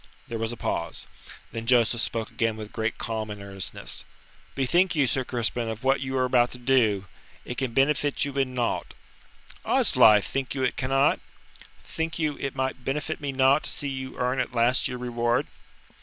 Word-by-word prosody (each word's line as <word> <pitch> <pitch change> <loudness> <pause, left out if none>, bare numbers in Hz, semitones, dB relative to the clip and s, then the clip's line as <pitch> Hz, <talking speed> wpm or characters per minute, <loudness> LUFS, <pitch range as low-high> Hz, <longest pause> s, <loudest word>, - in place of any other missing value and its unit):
There 115 - -4
was 115 0 -1
a 120 - -6
pause. - - -3 0.5
Then 115 0 -5
Joseph 120 -2 +3
spoke 115 -2 -2
again 115 -1 0
with 110 -1 -8
great 110 0 -1
calm 110 -2 -3
and 105 -1 -6
earnestness. 95 -6 -4 0.5
"Bethink 175 +7 +2
you, 145 -3 +4
Sir 130 +2 0
Crispin, 120 -1 -1
of 110 +1 -6
what 135 0 +3
you 130 0 -2
are 130 - +3
about 125 -1 +3
to - - -8
do. 120 -6 +2 0.4
It 125 - -4
can 130 -4 -2
benefit 145 +1 +2
you 140 - -4
in 130 -2 0
naught." 120 -2 -1 0.7
"Oddslife, 105 -2 +5
think 135 0 -3
you 130 - -1
it 125 - +1
cannot? 135 +2 +2 0.6
Think 160 0 -3
you 155 -3 0
it 135 -1 -3
will 130 0 0
benefit 150 +5 -3
me 140 -1 -2
naught 135 +2 +3
to - - -3
see 145 - -2
you 130 -1 -5
earn 125 +1 0
at 125 -1 -2
last 120 +2 +3
your 125 -2 -4
reward?" 120 -1 0
125 Hz, 185 wpm, -26 LUFS, 115-135 Hz, 0.7 s, Oddslife